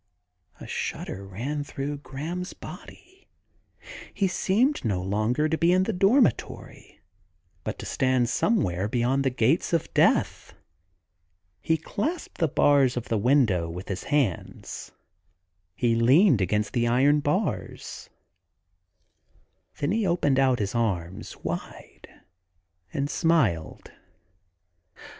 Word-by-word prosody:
A -, -, -9 dB
shudder 95 Hz, -, -4 dB
ran 135 Hz, +10 st, -4 dB
through 145 Hz, +1 st, -5 dB
Graham's 165 Hz, +7 st, -6 dB
body: 380 Hz, +2 st, -13 dB, 0.8 s
he 195 Hz, -, 0 dB
seemed 225 Hz, +10 st, +1 dB
no 100 Hz, -6 st, 0 dB
longer 110 Hz, +10 st, 0 dB
to 160 Hz, 0 st, -1 dB
be 170 Hz, +1 st, +4 dB
in 185 Hz, +1 st, +4 dB
the 225 Hz, -, -1 dB
dormitory, 200 Hz, +9 st, 0 dB, 0.6 s
but -, -, -4 dB
to -, -, -8 dB
stand 130 Hz, -3 st, +1 dB
somewhere 100 Hz, -, 0 dB
beyond 125 Hz, +4 st, +1 dB
the 135 Hz, -, +2 dB
gates 130 Hz, +8 st, +1 dB
of 165 Hz, -, -1 dB
death. -, -, +1 dB, 1.1 s
He 160 Hz, -, +1 dB
clasped 290 Hz, -, -4 dB
the 165 Hz, -, +3 dB
bars 140 Hz, -3 st, +3 dB
of 120 Hz, -, -5 dB
the 115 Hz, -, +1 dB
window 110 Hz, -, +2 dB
with 90 Hz, +3 st, -8 dB
his 95 Hz, -1 st, -4 dB
hands; 140 Hz, -, -2 dB, 0.8 s
he 115 Hz, +4 st, +1 dB
leaned 125 Hz, -, +4 dB
against 105 Hz, +3 st, 0 dB
the 120 Hz, -2 st, +1 dB
iron 135 Hz, +5 st, +4 dB
bars; 180 Hz, +8 st, -3 dB, 1.7 s
then 145 Hz, +3 st, -1 dB
he 215 Hz, -1 st, +1 dB
opened 145 Hz, -6 st, +2 dB
out 130 Hz, -2 st, +3 dB
his 105 Hz, -2 st, -2 dB
arms 95 Hz, -6 st, -2 dB
wide -, -, -7 dB, 0.8 s
and 140 Hz, 0 st, -1 dB
smiled. 135 Hz, -, 0 dB
135 Hz, 115 wpm, -26 LUFS, 110-165 Hz, 1.7 s, be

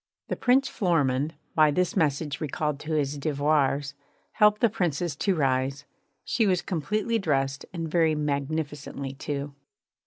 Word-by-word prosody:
The -, -, 0 dB
Prince 265 Hz, +2 st, +3 dB
Florimond, 150 Hz, -5 st, +1 dB, 0.2 s
by 155 Hz, -1 st, +5 dB
this 180 Hz, +5 st, 0 dB
message 150 Hz, -3 st, 0 dB
recalled 150 Hz, -1 st, -2 dB
to 155 Hz, +2 st, -4 dB
his 145 Hz, -1 st, 0 dB
devoirs, 145 Hz, -1 st, +1 dB, 0.4 s
helped 210 Hz, -1 st, +4 dB
the 235 Hz, -, +6 dB
Princess 175 Hz, -6 st, -1 dB
to 195 Hz, +4 st, +1 dB
rise. 135 Hz, -1 st, 0 dB, 0.4 s
She 225 Hz, -3 st, +1 dB
was 180 Hz, -2 st, +1 dB
completely 210 Hz, +6 st, -1 dB
dressed, 135 Hz, -6 st, -1 dB
and 165 Hz, -3 st, -4 dB
very 160 Hz, -1 st, +2 dB
magnificently 145 Hz, -1 st, -3 dB
too. 140 Hz, +1 st, -4 dB
150 Hz, 135 wpm, -26 LUFS, 140-175 Hz, 0.4 s, the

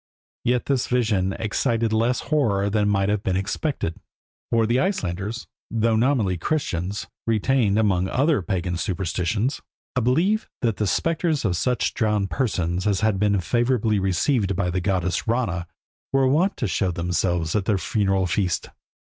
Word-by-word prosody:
Yet 125 Hz, 0 st, +1 dB
this 135 Hz, -3 st, 0 dB
vision 110 Hz, -6 st, +1 dB
excited 115 Hz, +2 st, 0 dB
less 115 Hz, +3 st, +1 dB
horror 105 Hz, -9 st, +1 dB
than 105 Hz, -1 st, +2 dB
might 100 Hz, -1 st, +1 dB
have 105 Hz, -1 st, 0 dB
been 95 Hz, -2 st, -1 dB
expected, 95 Hz, -, -2 dB, 0.5 s
for 115 Hz, -1 st, +3 dB
the 120 Hz, +3 st, +2 dB
Icelanders, 105 Hz, -, -2 dB, 0.2 s
though 115 Hz, 0 st, +1 dB
nominally 110 Hz, -7 st, +1 dB
Christians, 100 Hz, -, -2 dB, 0.2 s
retained, 110 Hz, -1 st, +2 dB
among 95 Hz, -4 st, +2 dB
other 140 Hz, -2 st, +2 dB
pagan 90 Hz, -1 st, -2 dB
superstitions, 95 Hz, -, -1 dB, 0.3 s
a 125 Hz, -, +2 dB
belief 170 Hz, -, +1 dB
that 115 Hz, -4 st, +1 dB
the 105 Hz, -, 0 dB
spectres 165 Hz, -, 0 dB
of 90 Hz, -3 st, +1 dB
such 125 Hz, +8 st, 0 dB
drowned 105 Hz, -3 st, 0 dB
persons 95 Hz, -7 st, -1 dB
as 100 Hz, -2 st, +1 dB
had 110 Hz, -3 st, +1 dB
been 100 Hz, -1 st, +2 dB
favourably 115 Hz, +2 st, +1 dB
received 95 Hz, -, +1 dB
by 90 Hz, -1 st, 0 dB
the 90 Hz, +1 st, -1 dB
goddess 90 Hz, 0 st, -1 dB
Rana 105 Hz, -8 st, -1 dB, 0.4 s
were 135 Hz, -1 st, +3 dB
wont 170 Hz, +9 st, +2 dB
to 120 Hz, -, -1 dB
show 95 Hz, 0 st, 0 dB
themselves 90 Hz, -1 st, -1 dB
at 100 Hz, -3 st, +1 dB
their 105 Hz, -1 st, +2 dB
funeral 95 Hz, -1 st, +1 dB
feast. 90 Hz, 0 st, -1 dB
105 Hz, 155 wpm, -23 LUFS, 95-120 Hz, 0.5 s, for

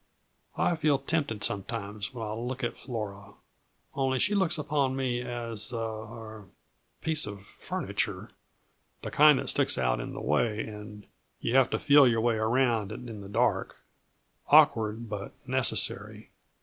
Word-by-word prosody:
I 175 Hz, -, +2 dB
feel 150 Hz, -3 st, +3 dB
tempted 135 Hz, -7 st, -2 dB
sometimes 100 Hz, +1 st, -3 dB
when 115 Hz, -3 st, -5 dB
I 105 Hz, -, -4 dB
look 125 Hz, +3 st, -4 dB
at 120 Hz, -, -1 dB
Flora 100 Hz, -5 st, -6 dB, 0.6 s
only 135 Hz, -1 st, 0 dB
she 210 Hz, +10 st, +2 dB
looks 190 Hz, -4 st, +2 dB
upon 145 Hz, -3 st, 0 dB
me 125 Hz, -2 st, -1 dB
as 120 Hz, -2 st, -3 dB
a 120 Hz, -, -3 dB
er 110 Hz, -1 st, -6 dB, 0.6 s
piece 160 Hz, -4 st, -1 dB
of 100 Hz, -2 st, -8 dB
furniture -, -, -4 dB, 0.7 s
the -, -, -4 dB
kind 150 Hz, -1 st, +7 dB
that -, -, 0 dB
sticks -, -, +1 dB
out 60 Hz, -2 st, +1 dB
in -, -, -5 dB
the -, -, -6 dB
way 105 Hz, -, +1 dB
and 105 Hz, -1 st, -9 dB, 0.3 s
you 120 Hz, -, -1 dB
have 135 Hz, -2 st, +5 dB
to -, -, 0 dB
feel 140 Hz, -1 st, +6 dB
your 115 Hz, -2 st, +2 dB
way 115 Hz, -1 st, +2 dB
around 115 Hz, -2 st, +1 dB
it 120 Hz, +3 st, -7 dB
in 110 Hz, -3 st, -7 dB
the 100 Hz, -, -9 dB
dark -, -, +1 dB, 0.7 s
awkward, 110 Hz, +1 st, +4 dB
but 105 Hz, -2 st, -6 dB
necessary. 130 Hz, -5 st, -1 dB
115 Hz, 155 wpm, -29 LUFS, 105-130 Hz, 0.7 s, kind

